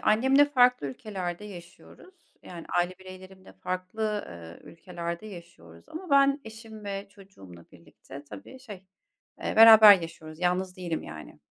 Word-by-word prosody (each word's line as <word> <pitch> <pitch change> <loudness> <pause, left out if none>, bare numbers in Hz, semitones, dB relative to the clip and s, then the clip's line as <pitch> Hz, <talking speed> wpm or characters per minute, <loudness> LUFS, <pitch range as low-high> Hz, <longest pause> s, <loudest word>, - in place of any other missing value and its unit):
Annemle 265 +6 +3
farklı 250 - +2
ülkelerde 180 +5 -6
yaşıyoruz. 190 - -14 0.3
Yani 170 -2 -11
aile 180 +1 -2
bireylerimle 185 - -14
farklı, 185 - -4
eee, 85 -1 -13
ülkelerde 170 +2 -7
yaşıyoruz 170 - -14
ama 345 +1 -9
ben 275 0 +3
eşim 220 -1 -12
ve 200 0 -6
çocuğumla 140 - -16
birlikte 140 +1 -14
tabii 105 - -12
şey, 210 -8 -12 0.6
eee, - - -3
beraber 220 -3 +9
yaşıyoruz; 160 -1 -10
yalnız 180 +1 -1
değilim 175 -3 -5
yani. 75 0 -12
185 Hz, 130 wpm, -26 LUFS, 170-220 Hz, 0.6 s, beraber